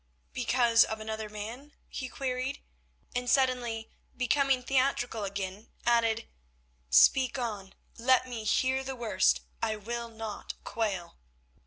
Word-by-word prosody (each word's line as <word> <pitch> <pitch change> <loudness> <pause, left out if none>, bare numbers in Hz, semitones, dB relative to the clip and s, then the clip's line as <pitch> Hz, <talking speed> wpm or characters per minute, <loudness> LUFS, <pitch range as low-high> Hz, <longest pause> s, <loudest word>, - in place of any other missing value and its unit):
"Because 235 -2 +4
of 220 - -4
another 220 0 -4
man?" 225 +8 -7
he 260 -2 -5
queried, 260 0 -3 0.6
and 245 0 -1
suddenly 245 -4 +1 0.3
becoming 260 +1 +2
theatrical 255 -4 +1
again, 195 +2 -5 0.2
added, 230 -1 +2 0.6
"Speak 255 - +5
on, 210 -6 -4 0.2
let 255 +2 +4
me 235 -3 -5
hear 260 +5 +2
the 265 0 -4
worst; 65 - +2 0.2
I 215 - 0
will 235 +3 -5
not 220 -2 -6
quail." 200 - -3
235 Hz, 120 wpm, -30 LUFS, 215-255 Hz, 0.6 s, Speak